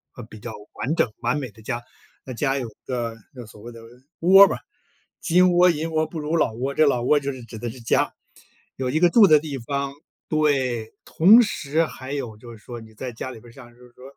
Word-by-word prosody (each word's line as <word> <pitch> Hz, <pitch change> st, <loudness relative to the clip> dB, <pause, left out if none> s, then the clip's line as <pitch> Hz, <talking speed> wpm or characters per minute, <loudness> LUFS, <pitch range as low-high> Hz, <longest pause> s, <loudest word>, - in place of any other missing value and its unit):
呃， 120 Hz, -, -9 dB
比 110 Hz, -1 st, -13 dB
较 120 Hz, -, -7 dB, 0.2 s
完 150 Hz, +6 st, -2 dB
整、 115 Hz, -, +1 dB
完 120 Hz, +5 st, 0 dB
美 130 Hz, -6 st, -5 dB
的 110 Hz, -, -18 dB
家， 120 Hz, +2 st, -4 dB, 0.4 s
那 130 Hz, -, -7 dB
家 135 Hz, +2 st, -1 dB
有 125 Hz, -3 st, -3 dB
一 110 Hz, -, -21 dB
个 120 Hz, -3 st, -3 dB, 0.2 s
就 125 Hz, -3 st, -9 dB
所 105 Hz, -1 st, -15 dB
谓 120 Hz, -, -9 dB
的 115 Hz, -1 st, -12 dB, 0.4 s
窝 195 Hz, +3 st, +8 dB
吧， -, -, -3 dB, 0.6 s
金 180 Hz, +1 st, +3 dB
窝 180 Hz, +1 st, +5 dB
银 165 Hz, 0 st, -2 dB
窝 155 Hz, 0 st, 0 dB
不 165 Hz, -, -7 dB
如 150 Hz, +2 st, -2 dB
老 130 Hz, -, +1 dB
窝， 130 Hz, +4 st, -3 dB
这 155 Hz, -, +4 dB
老 125 Hz, -3 st, +1 dB
窝 145 Hz, +3 st, +3 dB
就 140 Hz, 0 st, -3 dB
是 130 Hz, -2 st, -10 dB
指 110 Hz, -1 st, -10 dB
的 120 Hz, -, -4 dB
是 125 Hz, +2 st, -10 dB
家。 115 Hz, -, +1 dB, 0.6 s
有 130 Hz, -1 st, -3 dB
一 155 Hz, +5 st, 0 dB
个 175 Hz, 0 st, +5 dB
住 215 Hz, -1 st, +7 dB
的 155 Hz, -3 st, +6 dB
地 145 Hz, -3 st, -6 dB
方， 140 Hz, +3 st, -3 dB, 0.4 s
对， 130 Hz, -7 st, 0 dB
同 205 Hz, +9 st, +6 dB
时 160 Hz, -5 st, -1 dB
还 130 Hz, -3 st, -9 dB
有 120 Hz, -7 st, -5 dB
就 120 Hz, +1 st, -12 dB
是 115 Hz, -, -12 dB
说 120 Hz, +2 st, -10 dB
你 110 Hz, 0 st, -15 dB
在 125 Hz, +3 st, -6 dB
家 120 Hz, +3 st, -7 dB
里 115 Hz, -, -11 dB
边 120 Hz, -, -16 dB
儿 -, -, -15 dB
像 120 Hz, -1 st, -14 dB
就 120 Hz, -, -25 dB
是 -, -, -24 dB
说 125 Hz, -, -17 dB
130 Hz, 265 characters per minute, -23 LUFS, 120-155 Hz, 0.6 s, 窝